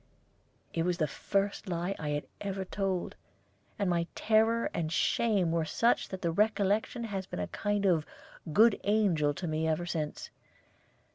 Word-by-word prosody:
It 165 - 0
was 175 +1 0
the 160 - +2
first 195 +6 -2
lie 175 +2 -1
I 150 - -3
had 145 0 -2 0.2
ever 195 -1 -3
told, 190 -2 -2 0.6
and 200 - 0
my 170 -1 +1
terror 225 +1 +2
and 160 -2 -2
shame 195 0 +2
were 165 -1 +1
such 230 +9 +1
that 190 -1 -6
the 170 - +1
recollection 210 +4 +1
has 195 -4 -4
been - - -5
a 90 - -1
kind 205 -1 -1
of 170 -5 +3 0.5
good 220 +6 +5
angel 185 -9 +2
to 180 - -5
me 160 0 0
ever 160 +2 0
since. 155 -4 -4
190 Hz, 160 wpm, -30 LUFS, 165-205 Hz, 0.6 s, good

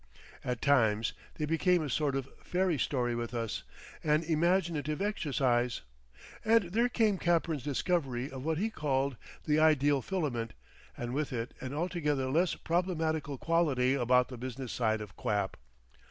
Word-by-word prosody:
At 125 -2 -3
times 115 -6 +3 0.2
they 150 - -1
became 165 +2 +2
a - - -2
sort 145 0 +1
of 135 -1 -2
fairy 180 -4 0
story 120 -3 0
with 120 0 -3
us, 115 -2 -2 0.4
an 155 +1 +3
imaginative 165 -2 +1
exercise. 135 - 0 0.6
And 220 -5 +3
there 235 +5 +2
came 215 -6 +2
Capern's 165 -3 +1
discovery 135 -3 -1
of 130 -1 -7
what 160 +1 0
he 220 +6 0
called 140 - 0 0.3
the 150 0 +3
ideal 145 -3 +4
filament 135 -12 -2 0.4
and 120 0 -4
with 150 +1 -1
it 120 -1 -3
an 130 +2 -5
altogether 150 -6 0
less 170 +4 +2
problematical 160 -5 -1
quality 145 -6 +2
about 125 -1 +3
the 125 - -7
business 130 0 -5
side 110 -2 0
of 105 -3 -9
quap. 100 -2 -1
145 Hz, 150 wpm, -31 LUFS, 125-170 Hz, 0.6 s, ideal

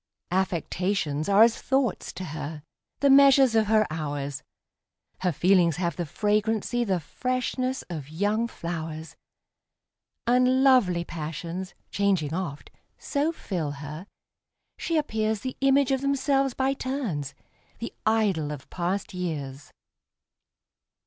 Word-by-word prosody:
Affections 180 -3 -1
are 200 +2 +7
as 230 0 +3
thoughts 265 -5 0
to 185 - -6
her, 150 -2 -6 0.4
the 280 - +4
measures 275 -2 +7
of 220 -2 +3
her 215 0 +4
hours; 145 -3 -3 0.8
Her 180 -1 +1
feelings 175 0 +3
have 170 0 -1
the 175 -2 -3
fragrancy, 215 +6 0
the 190 -5 0
freshness, 255 - -2
of 155 -5 -7
young 205 +8 0
flowers; 165 -5 -6 1.1
And 255 +2 +4
lovely 215 -11 +4
passions, 165 +4 -5 0.2
changing 190 -7 +1
oft, 165 -5 -4 0.3
so 290 +2 0
fill 170 - -3
her, 150 +6 -8 0.7
she 330 -2 0
appearsThe 220 -2 -2
image 275 0 +4
of 265 -1 +1
themselves 275 -1 +1
by 265 +1 +1
turns,—the 235 - -6
idol 205 -9 +1
of 145 -3 -8
past 185 +3 -2
years! 145 -6 -5
195 Hz, 115 wpm, -26 LUFS, 160-250 Hz, 1.1 s, are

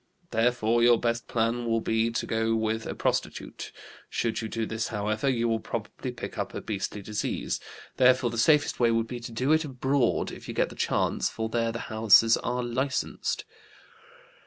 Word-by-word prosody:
Therefore 115 0 +2
your 120 -1 +6
best 115 0 -1
plan 115 +1 0
will 115 0 +2
be 115 +1 +1
to 115 - -2
go 115 0 0
with 110 0 -1
a - - -4
prostitute. - - -2 0.4
Should 115 -1 -1
you 110 - -4
do 115 0 -2
this, 110 0 -2
however, 110 +4 -1
you 120 -2 +1
will 115 -1 +1
probably - - -5
pick - - -7
up - - -3
a - - -4
beastly 100 -1 -4
disease. 105 +1 -2 0.4
Therefore 130 -1 +4
the 115 - -3
safest 150 +4 +3
way 120 -1 +4
would 115 0 +1
be 120 +1 -6
to 120 0 -8
do 125 +6 0
it 160 +1 +4
abroad 135 -2 0
if - - -10
you - - -6
get - - +1
the - - -11
chance, - - 0
for 110 0 -4
there 115 0 0
the 115 - -5
houses 110 +1 +6
are 125 0 -2
licensed.' 130 +3 -2
115 Hz, 185 wpm, -27 LUFS, 110-120 Hz, 0.4 s, your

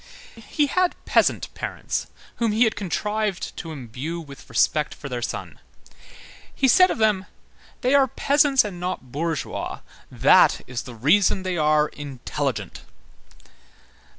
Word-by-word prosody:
He 235 +6 -1
had 365 +5 +1
peasant - - +2
parents - - -4 0.3
whom 230 -3 +1
he 225 +3 +4
had 220 - +1
contrived 210 0 -2
to 165 - -6
imbue 140 +4 -6
with 140 -4 -12
respect 150 -1 +1
for 140 - -8
their 125 -2 -4
son. - - -5 1.0
He 270 - +2
said 365 +8 +6
of - - -2
them: 210 -4 +1 0.5
"They 255 0 +2
are 275 -1 +5
peasants 280 +2 +3
and 190 -4 -6
not 180 -8 -5
bourgeois; 160 +1 -3 0.3
that - - +5
is 125 -2 -4
the 120 - -9
reason 185 - +3
they 185 -1 -2
are 150 -1 +3
intelligent." 140 - -4
185 Hz, 135 wpm, -23 LUFS, 150-225 Hz, 1.0 s, said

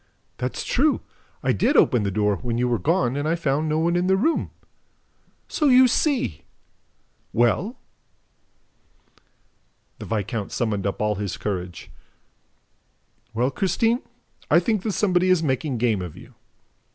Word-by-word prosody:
"That's - - -3
true! 290 +4 +2 0.4
I - - +2
did 290 - +2
open 125 - +4
the 100 - -1
door, 105 0 +1
when 120 -2 -3
you 125 +1 +1
were 120 -2 0
gone, 160 -6 +1
and 145 +2 -2
I 165 - +2
found 155 -1 -1
no 155 - +1
one 170 +2 +1
in 175 +1 +1
the 190 0 +3
room." 315 +11 +1 1.0
"So 300 - 0
you 255 -1 +7
see!... 245 - 0 0.9
Well?" 150 - +1 2.2
The - - -7
viscount 110 0 -3
summoned 105 -4 -1
up 100 - -3
all 105 0 +1
his 100 -4 -3
courage. 90 -4 -5 1.4
"Well, 125 +4 +1
Christine, 225 - +1 0.5
I - - +6
think 220 -5 0
that 210 0 -2
somebody 185 -3 +2
is 180 -3 +3
making 135 -1 -1
game 110 -4 +1
of 90 -4 -7
you." - - -14
140 Hz, 145 wpm, -23 LUFS, -, 2.2 s, you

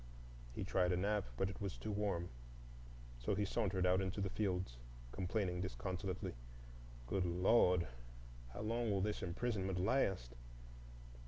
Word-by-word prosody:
He - - -2
tried 90 -1 +2
a - - +2
nap, 100 +2 +1
but 95 - +2
it 95 +1 -7
was 100 -2 -2
too 110 - -3
warm. 100 -4 0 0.9
So - - 0
he 105 +1 +1
sauntered 95 -3 +1
out 90 +1 +4
into 95 +1 -2
the 95 -1 0
fields, 90 - -1 0.3
complaining 90 - 0
disconsolately, 95 +5 -3 0.7
"Good 95 +10 +1
Lord! 90 0 +4 0.6
how 60 - -6
long 115 +2 0
will 100 -2 +2
this 105 +1 0
imprisonment 95 0 -1
last!" 95 - +2
95 Hz, 140 wpm, -39 LUFS, 90-105 Hz, 0.9 s, out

